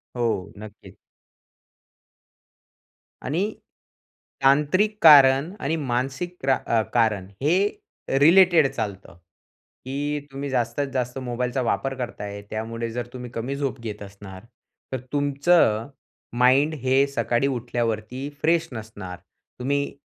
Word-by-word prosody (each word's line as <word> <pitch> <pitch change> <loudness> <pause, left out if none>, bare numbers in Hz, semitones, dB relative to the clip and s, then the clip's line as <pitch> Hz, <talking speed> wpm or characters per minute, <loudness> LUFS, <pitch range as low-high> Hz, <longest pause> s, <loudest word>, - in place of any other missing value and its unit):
हो, 115 -6 -1
नक्कीच. 105 0 -12 2.3
आणि 185 +11 -1 0.9
तांत्रिक 150 +10 +3
कारण 140 0 +7
आणि 155 +4 -1
मानसिक 135 +5 -2
त्रा 130 -1 +2
अ, 115 -1 +3
कारण 110 -5 +1
हे 160 +6 +3 0.6
रिलेटेड 170 -1 +6
चालतं, 100 -6 -5 0.7
की 145 +2 -2
तुम्ही 140 +1 -5
जास्तीत-जास्त 130 0 -2
मोबाईलचा 125 +2 -1
वापर 135 +2 -1
करताय 105 -5 -6
त्यामुळे 115 +1 -4
जर 120 0 -4
तुम्ही 125 -1 -7
कमी 125 +5 -3
झोप 135 -3 -3
घेत 105 -3 -6
असणार, 100 -1 -11 0.5
तर 130 - -1
तुमचं 140 -5 +2 0.5
माइंड 135 +5 +4
हे 135 +2 +4
सकाळी 135 -1 0
उठल्यावरती 120 +1 -3
फ्रेश 165 +1 +2
नसणार, 100 -6 -8 0.4
तुम्ही 140 +2 -1
130 Hz, 105 wpm, -24 LUFS, 115-145 Hz, 2.3 s, कारण